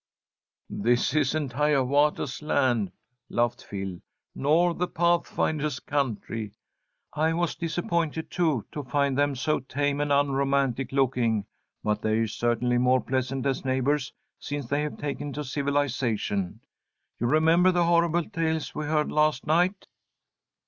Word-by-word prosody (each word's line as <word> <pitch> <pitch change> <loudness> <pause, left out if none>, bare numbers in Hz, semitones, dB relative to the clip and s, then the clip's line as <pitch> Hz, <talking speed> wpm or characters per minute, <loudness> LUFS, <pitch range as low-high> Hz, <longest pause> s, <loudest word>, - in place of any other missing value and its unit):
"This 120 +3 +2
isn't 150 -2 0
Hiawatha's 145 0 +1
land," 120 -9 +1 0.4
laughed 120 -1 0
Phil, 95 -3 -5 0.3
"nor 165 +5 +2
the 180 +1 -1
Pathfinder's 160 -4 0
country. 115 -6 -3 0.6
I 155 +2 +1
was 170 -1 0
disappointed, 165 -1 -2
too, 155 - +1
to 150 - -4
find 140 +1 0
them 145 0 +1
so 155 +4 0
tame 145 +2 -1
and 145 0 -1
unromantic 140 -2 +1
looking, 120 -6 +1 0.4
but 105 0 0
they're 110 +1 +1
certainly 120 +2 0
more 125 +1 +4
pleasant 130 0 -2
as 135 -2 0
neighbours 135 +1 0 0.3
since 145 -2 -4
they 145 +5 0
have 150 0 -4
taken 145 0 -4
to 150 - -4
civilization. 130 -9 -1 0.6
You 120 - 0
remember 160 +6 +4
the 175 -1 +2
horrible 170 0 +2
tales 160 -1 -2
we 155 - -3
heard 150 0 0
last 150 -3 +2
night." 175 +5 +2
140 Hz, 130 wpm, -26 LUFS, 125-155 Hz, 0.6 s, more